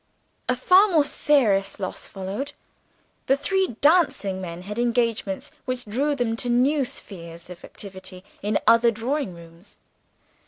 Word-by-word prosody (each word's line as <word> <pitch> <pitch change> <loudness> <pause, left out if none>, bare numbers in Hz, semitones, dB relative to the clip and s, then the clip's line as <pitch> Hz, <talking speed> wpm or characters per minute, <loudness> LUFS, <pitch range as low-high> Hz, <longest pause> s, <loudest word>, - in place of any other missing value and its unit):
A 255 - +3
far 365 +11 +6
more 330 -7 +4
serious 220 -11 +2
loss 185 -2 -5
followed. 200 +9 -5 0.7
The 270 - +4
three 380 - 0
dancing 285 - +3
men 175 -1 -7
had 210 +4 -5
engagements 230 -5 0
which 255 -1 -3
drew 275 +8 0
them 240 -4 0
to 245 - -2
new 265 +4 +3
spheres 170 -6 -9
of 175 - -11
activity 190 -2 -9 0.2
in 210 0 +1
other 230 +1 +6
drawing 230 - -2
rooms. 170 +2 -15
230 Hz, 135 wpm, -24 LUFS, 190-275 Hz, 0.7 s, far